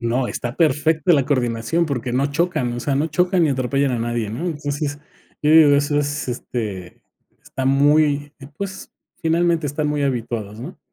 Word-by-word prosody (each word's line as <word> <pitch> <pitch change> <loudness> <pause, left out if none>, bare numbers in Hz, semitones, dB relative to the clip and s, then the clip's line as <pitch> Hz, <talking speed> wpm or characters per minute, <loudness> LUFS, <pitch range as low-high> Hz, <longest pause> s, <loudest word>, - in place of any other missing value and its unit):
No, 120 +2 0
está 120 +1 -4
perfecta 160 +1 +2
la 140 -4 +3
coordinación 130 +4 0
porque 125 -4 -3
no 135 +3 +1
chocan, 150 -4 -1
o 120 - -4
sea, 140 +1 -1
no 145 +4 +1
chocan 180 +3 +1
ni 150 - +2
atropellan 135 +1 0
a 120 - -1
nadie, 115 -2 -2
¿no?, 145 +11 -4
entonces, 145 -2 -3 0.4
yo 150 - +3
digo, 155 -3 +7
eso 145 +1 +1
es, 145 -1 -2
este, 105 -7 -5 0.4
está 130 - -5
muy, 145 +1 +3 0.3
pues, 195 -1 -6 0.3
finalmente 165 -1 +1
están 150 +2 -2
muy 150 -1 -1
habituados, 115 -5 -3
¿no? - - -8
145 Hz, 170 wpm, -21 LUFS, 125-155 Hz, 0.4 s, digo